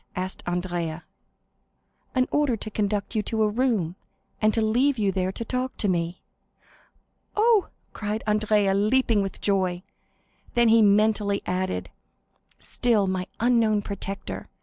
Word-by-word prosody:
asked 185 0 -4
Andrea. 175 -2 -2 1.1
"An 255 0 +3
order 290 -6 +2
to 215 +1 -7
conduct 205 0 -1
you 215 - +1
to 220 +1 -1
a - - +3
room, 210 -7 0 0.5
and 215 0 +4
to 225 - -1
leave 245 +5 +2
you 205 -3 +1
there 185 0 -1
to 230 - -6
talk 255 +1 -3
to 210 - 0
me." 170 -1 -1 1.1
"Oh," 435 -2 +4 0.3
cried 215 +1 -3
Andrea, 210 -2 +2
leaping 215 +2 +2
with 195 -1 -5
joy. 185 -3 +1 0.7
Then 235 -1 +4
he 225 0 +6
mentally 210 0 +3
added,—"Still 195 +4 -3
my 185 -1 -2
unknown 225 -3 +3
protector! 200 0 -6
210 Hz, 130 wpm, -25 LUFS, 190-230 Hz, 1.1 s, he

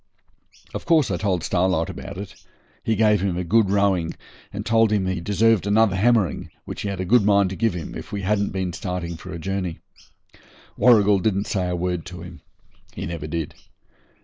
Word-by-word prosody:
Of - - -5
course 160 - +4
I 90 - 0
told 95 -4 -1
Starlight 90 -2 +1
about 95 0 -8
it. 100 -1 -7 0.5
He 110 - +1
gave 105 -2 +3
him 95 -3 -1
a 90 - -1
good 105 +3 +3
rowing, 95 -4 +1 0.4
and - - -5
told 115 -1 +3
him 100 -3 +1
he 95 -2 -2
deserved 105 +2 +2
another 105 -1 +3
hammering, 110 -1 +2 0.2
which - - -6
he 100 - -3
had 100 -2 -4
a 95 - -2
good 120 +3 +4
mind 100 -2 +3
to - - -4
give 110 -2 0
him, 85 - -6
if - - -8
we 100 -1 -4
hadn't 100 +1 +1
been 95 -2 -3
starting 85 0 -4
for 90 +3 -10
a 85 - -5
journey. 90 0 -3 1.0
Warrigal 105 -4 +5
didn't 100 +1 0
say 90 -3 -1
a 90 - -1
word 90 -1 -2
to 90 +1 -8
him. - - -11 0.5
He - - -4
never 80 -2 -5
did. 80 -1 -3
95 Hz, 200 wpm, -23 LUFS, 90-105 Hz, 1.0 s, Warrigal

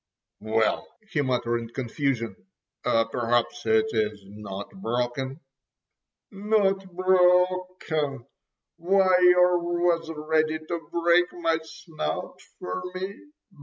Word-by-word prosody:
"Well," 110 +1 0 0.2
he 145 - +1
muttered 125 -3 0
in 115 -1 -7
confusion, 120 -3 -2 0.5
"perhaps 115 +1 0
it 220 0 +4
is 105 -2 -1
not 100 0 -8
broken." 125 +2 -2 0.9
"Not 195 -2 +1
broken! 180 -6 +2 0.5
Why 185 +2 +3
yer 180 0 +5
was 175 -1 0
ready 155 0 0
to 165 +1 -6
break 170 +1 +3
my 165 -2 0
snout 160 - -5 0.2
for 90 - -4
me. 190 +2 -4
160 Hz, 95 wpm, -26 LUFS, 120-180 Hz, 0.9 s, yer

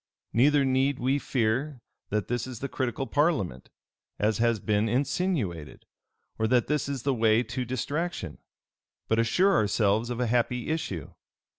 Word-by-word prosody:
Neither 140 +4 +4
need 135 +1 +2
we 135 +3 +1
fear 130 +3 -1 0.3
that 105 -2 -1
this 120 +1 -2
is 130 -2 -7
the 140 - -3
critical 130 0 -2
parliament, 125 - 0 0.5
as 105 +1 +1
has 115 -1 +2
been 105 +2 +1
insinuated; 120 - -1 0.5
or 110 - +2
that 120 0 +3
this 150 -1 -1
is 135 -4 -4
the 140 - +1
way 115 -1 +3
to 125 +2 -4
distraction: 145 +8 -3 0.7
but 110 - +2
assure 180 - +3
ourselves 105 - +2
of 120 -1 -3
a 125 - +1
happy 120 +2 0
issue. 100 - -3
125 Hz, 150 wpm, -27 LUFS, 110-140 Hz, 0.7 s, Neither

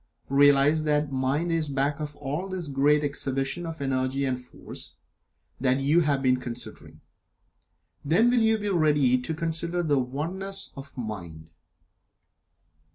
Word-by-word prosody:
Realize 145 +2 +5
that 150 -1 +1
Mind 135 +6 0
is 165 -2 +1
back 140 +1 0
of 150 -1 -5
all 150 +7 -4
this 180 -5 -4
great 145 +2 +3
exhibition 140 +3 -1
of 165 0 -6
Energy 135 0 0
and 125 -1 -1
Force 125 - -8 0.6
that 130 0 +2
you 145 +5 +3
have 145 -4 +1
been 130 -1 +3
considering. 125 -2 -7 1.0
Then 185 +12 +4
will 245 -1 +3
you 220 0 +3
be 205 -1 -3
ready 150 -8 +3
to 125 +6 -3
consider 165 +2 -1
the 145 -4 +2
Oneness 175 +10 -3
of 135 0 -10
Mind. 85 -9 -7
145 Hz, 140 wpm, -26 LUFS, 135-165 Hz, 1.0 s, Realize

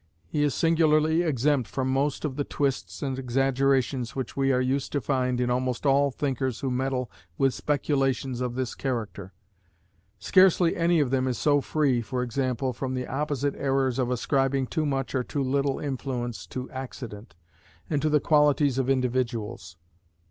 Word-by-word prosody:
He 150 - -2
is 145 -1 +1
singularly 160 -1 +3
exempt 145 -5 +1
from 130 -1 -2
most 140 +3 0
of 140 -3 -3
the 145 - -1
twists 140 -1 -2
and 135 -1 -2
exaggerations 135 -1 +1
which 130 -3 -4
we 135 0 +2
are 125 - +2
used 130 +2 -1
to 145 - +1
find 125 -2 0
in 125 0 +1
almost 125 +1 -1
all 140 0 +4
thinkers 130 -3 -2
who 135 - -1
meddle 130 -1 -1 0.3
with 135 -1 +2
speculations 135 -3 0
of 125 -1 -2
this 130 -2 -2
character. 110 -7 -4 0.9
Scarcely 185 -2 +4
any 170 -1 +3
of 130 -4 0
them 130 -1 +1
is 125 -3 -1
so 145 -1 +3
free 135 -5 +1
(for 125 +2 -3
example) 130 +1 -1
from 130 +2 -3
the 125 0 -2
opposite 145 +1 -1
errors 135 -2 0
of 125 -1 +1
ascribing 135 +2 +1
too 155 +3 -1
much 135 -2 -2
or 130 -2 +1
too 140 +2 -2
little 140 +1 0
influence 125 -4 -4
to 130 0 -5
accident, 115 - -8 0.5
and 145 -3 0
to 155 - +1
the 150 0 +4
qualities 145 -3 +3
of 135 0 0
individuals. 120 -10 -1
135 Hz, 170 wpm, -26 LUFS, 125-145 Hz, 0.9 s, all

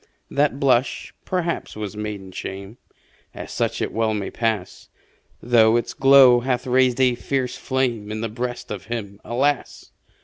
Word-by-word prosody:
That 140 -1 +1
blush, 130 -2 +1
perhaps, 175 -2 -2
was 105 -1 -5
maiden 105 -3 -6
shame 95 +5 -7 0.6
As - - -8
such - - -1
it - - -4
well 110 -1 0
may 100 -2 -4
pass 110 -5 -3 0.5
Though 115 -1 +5
its 120 - -3
glow 135 -2 +7
hath 125 +1 -1
raised 130 0 +2
a 130 -2 +4
fiercer 125 +1 -3
flame 120 -6 -1
In 110 0 -4
the 115 - -1
breast 120 +2 -5
of 100 -2 -6
him, 105 -3 -6
alas! 135 +4 -1
120 Hz, 150 wpm, -22 LUFS, 105-130 Hz, 0.6 s, glow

